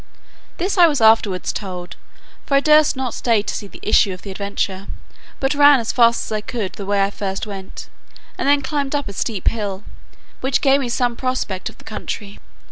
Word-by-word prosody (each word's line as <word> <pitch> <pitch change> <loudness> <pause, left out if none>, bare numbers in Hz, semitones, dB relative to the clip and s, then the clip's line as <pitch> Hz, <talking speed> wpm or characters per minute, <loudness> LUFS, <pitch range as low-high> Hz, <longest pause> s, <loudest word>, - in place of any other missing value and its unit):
This 370 +2 -1
I 345 - +9
was 290 -4 0
afterwards 220 -4 +3
told, 180 -3 -6 0.5
for 280 - 0
I - - +6
durst 305 0 +4
not 260 -3 -3
stay 225 -4 +1
to - - -4
see 205 - -5
the - - -14
issue 210 -1 +3
of 185 - -11
the 200 - -7
adventure; 200 0 -3 0.5
but 270 +2 +1
ran 290 -1 +6
as 225 - -2
fast 235 -1 +3
as - - -9
I 215 - -2
could 210 -3 -4
the 200 - -8
way 200 -1 +2
I 195 - 0
first 195 -1 -4
went, 195 -2 -8 0.5
and - - -1
then 285 -1 +3
climbed 285 0 -2
up 285 -4 -2
a 200 - -6
steep 200 -1 -3
hill, 205 -3 -4 0.6
which 265 +1 +1
gave 275 0 +4
me 250 - -3
some 240 0 0
prospect 255 -7 -3
of - - -16
the - - -17
country. 210 -1 -6
225 Hz, 210 wpm, -20 LUFS, 200-270 Hz, 0.6 s, I